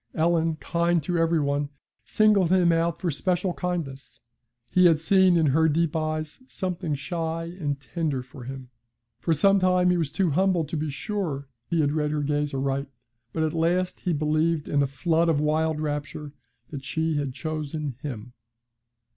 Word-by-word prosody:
Ellen, 165 0 +2
kind 170 0 0
to 175 +2 -1
every 165 0 +2
one, 145 0 0 0.3
singled 210 -5 +3
him 180 -2 +4
out 165 0 +1
for 175 - -1
special 180 +4 0
kindness. 165 -8 -4 0.5
He 180 -1 +5
had 160 -3 +4
seen 185 +1 +4
in 160 - +3
her 160 +1 +4
deep 165 +1 +1
eyes 155 +5 -3
something 180 - -3
shy 165 +3 -3 0.2
and 145 -4 -2
tender 145 -2 -2
for 125 0 -12
him. 130 -1 -8 0.5
For 165 - -1
some 195 +6 +4
time 180 -1 +3
he 180 - +2
was 160 -4 -1
too 170 +1 +1
humble 185 +2 +2
to 150 +2 -5
be 155 0 -2
sure 150 -4 -3 0.2
he 165 -2 +2
had 145 -1 +2
read 150 -1 0
her 150 -1 -1
gaze 145 0 0
aright, 135 +1 -1 0.4
but 160 - -1
at 155 - 0
last 175 +3 0
he 180 - -1
believed 155 +1 +1
in 145 - +2
a 140 - +2
flood 165 +4 +1
of 155 -3 +2
wild 155 +1 +1
rapture 150 -1 -4 0.4
that 140 -3 -6
she 160 +2 -1
had 140 -2 -1
chosen 155 -3 -4
him. 125 -4 -6
160 Hz, 175 wpm, -26 LUFS, 145-170 Hz, 0.5 s, He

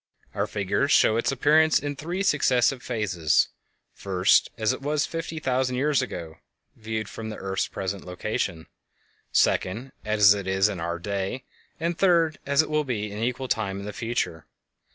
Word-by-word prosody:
Our - - -1
figures 100 +8 0
show 110 - +5
its 115 - +1
appearance 155 +4 +4
in 145 0 -3
three 175 +7 -3
successive 135 -7 +2
phases: 95 -11 +1 0.4
first, 95 -1 +2
as 110 -2 +1
it - - -7
was 145 +1 0
fifty 165 -1 -5
thousand 130 -3 0
years 140 +1 +2
ago 80 -2 -6 0.4
(viewed 110 -1 -4
from 110 +1 -7
the 110 - -5
earth's 95 -1 -2
present 95 0 -4
location); 90 -2 -3 0.7
second, 115 +8 +1
as 105 -2 +5
it 100 -2 -5
is 95 +2 +3
in 100 -4 -5
our 85 +1 -2
day; 100 +6 -3 0.4
and, 170 +1 -1
third, 165 -4 +3
as 140 +2 +4
it - - -8
will 150 0 +2
be 105 -6 -3
an 105 +2 -6
equal 125 +3 -2
time 100 -5 -1
in 100 - -7
the 105 - -6
future. 115 -9 -3
110 Hz, 170 wpm, -25 LUFS, 100-140 Hz, 0.7 s, show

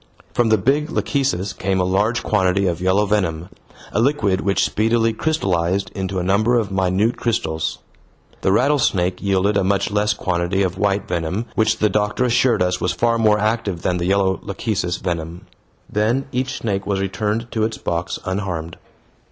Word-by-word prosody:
From 120 -2 +2
the 110 - +5
big 140 +9 +1
lachecis 115 - -1
came 95 0 -1
a - - +2
large 100 +6 +1
quantity 100 -1 +2
of 85 -1 -1
yellow 95 +3 +2
venom, 95 -5 -1 0.4
a 110 - +1
liquid 105 -8 +1
which 100 0 +1
speedily 115 +1 +1
crystallized 95 - 0
into 95 0 -3
a 90 - -1
number 105 +6 +2
of 105 -4 -1
minute 95 +4 +1
crystals. 80 -9 -1 0.6
The 95 - +2
rattlesnake 100 -8 +2
yielded 100 +1 +1
a 100 - +2
much 100 +1 0
less 105 0 +1
quantity 90 +1 0
of 95 -1 -1
white 100 -1 0
venom, 90 +5 -2
which 110 - +2
the 105 - +3
doctor 105 +4 0
assured 125 -3 +3
us 90 0 -1
was - - 0
far 115 0 +1
more 105 -2 +4
active 105 -4 -1
than 90 - +1
the 85 0 -2
yellow 95 -1 +2
lachecis 95 -3 -2
venom. 85 0 -4 0.4
Then 115 +6 0
each 130 +1 -2
snake 100 -3 -2
was 100 -2 0
returned 105 +4 -2
to 110 - 0
its 110 0 -1
box 85 +1 -3
unharmed. 95 -4 -3
100 Hz, 170 wpm, -20 LUFS, 90-110 Hz, 0.6 s, the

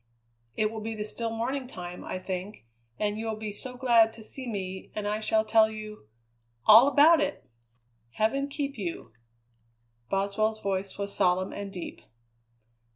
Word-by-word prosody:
It 215 0 +1
will 220 -1 -6
be 225 +1 -4
the 210 - -3
still 225 +2 -3
morning 250 +4 -2
time, 180 -6 -8
I - - -4
think, 185 - -6 0.3
and 210 0 -1
you 225 - -3
will 220 - -1
be 215 -1 -5
so 250 +4 -6
glad 235 -3 +5
to 225 - -12
see 260 +3 -6
me, 190 -4 -5
and 210 -1 -2
I 210 +1 0
shall 220 0 +1
tell 220 0 +5
you 215 - -9 0.6
all 225 +5 +9
about 305 +3 +6
it!" 295 - -3 0.7
"Heaven 275 +6 +1
keep 280 -3 -4
you!" 170 - -5 1.0
Boswell's 205 +3 0
voice 195 -1 -3
was 200 0 -4
solemn 185 0 +2
and 200 -1 -6
deep. 180 -3 -7
215 Hz, 160 wpm, -28 LUFS, 200-230 Hz, 1.0 s, all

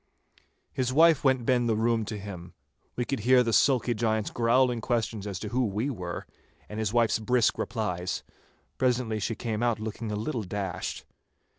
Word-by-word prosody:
His 130 -1 0
wife 160 +2 +5
went 130 -3 +2
ben 120 -1 +2
the 110 - +2
room 115 0 +1
to 105 - -5
him. 95 -3 -9 0.4
We 120 - -1
could 135 - -2
hear 125 +3 +5
the 115 -1 -1
sulky 125 +2 +3
giant's 110 -1 0
growling 120 0 +2
questions 115 -4 -1
as 100 -3 -4
to - - -4
who 125 +2 +1
we 110 +8 -1
were, 90 -7 -5 0.4
and 105 - -6
his 110 -2 0
wife's 115 -1 +2
brisk 120 +1 +2
replies. 90 -6 -2 0.6
Presently 125 -4 +1
she 110 +3 -2
came 110 0 -3
out 120 -2 +1
looking 110 0 -5
a - - -2
little 115 +4 -2
dashed. 95 -3 -4
115 Hz, 175 wpm, -28 LUFS, 105-125 Hz, 0.6 s, wife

